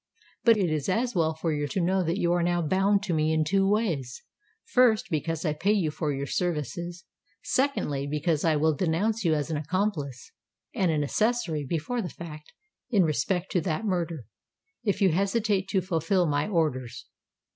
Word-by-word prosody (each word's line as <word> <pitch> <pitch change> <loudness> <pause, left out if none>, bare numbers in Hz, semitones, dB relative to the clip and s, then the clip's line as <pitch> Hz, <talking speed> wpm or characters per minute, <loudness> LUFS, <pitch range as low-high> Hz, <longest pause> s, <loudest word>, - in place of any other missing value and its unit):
But 230 -2 +6
it 185 -5 +1
is 155 0 -1
as 235 +6 0
well 160 -4 +1
for 160 0 -1
you 145 -1 -1
to 190 - -2
know 185 +2 +2
that 170 +2 -1
you 175 -3 +1
are 175 - +1
now 175 0 +1
bound 195 +5 +2
to 190 -4 -1
me 155 0 +2
in 160 0 +2
two 195 +5 +2
ways: 170 - -1 0.4
first, 235 -6 +3
because 165 +1 -2
I 155 - +1
pay 195 +7 +1
you 175 -8 +1
for 150 0 -2
your 140 0 -3
services—secondly, 175 - -2
because 150 +1 0
I 160 -2 +3
will 155 +1 +2
denounce 190 +8 0
you 165 -3 +3
as 150 +1 -2
an 155 - 0
accomplice 155 - -2 0.4
and 185 - +1
an 155 -2 +1
accessory 170 - 0
before 170 - -2
the 180 - -4
fact, 155 -3 -10 0.4
in 205 -7 +4
respect 180 +3 -1
to 180 - +1
that 165 +5 -2
murder, 170 - -2 0.6
if 200 -2 0
you 190 - +6
hesitate 200 +2 +1
to 195 -1 +1
fulfil 175 +1 +1
my 145 0 0
orders! 150 - -1
170 Hz, 180 wpm, -27 LUFS, 155-195 Hz, 0.6 s, But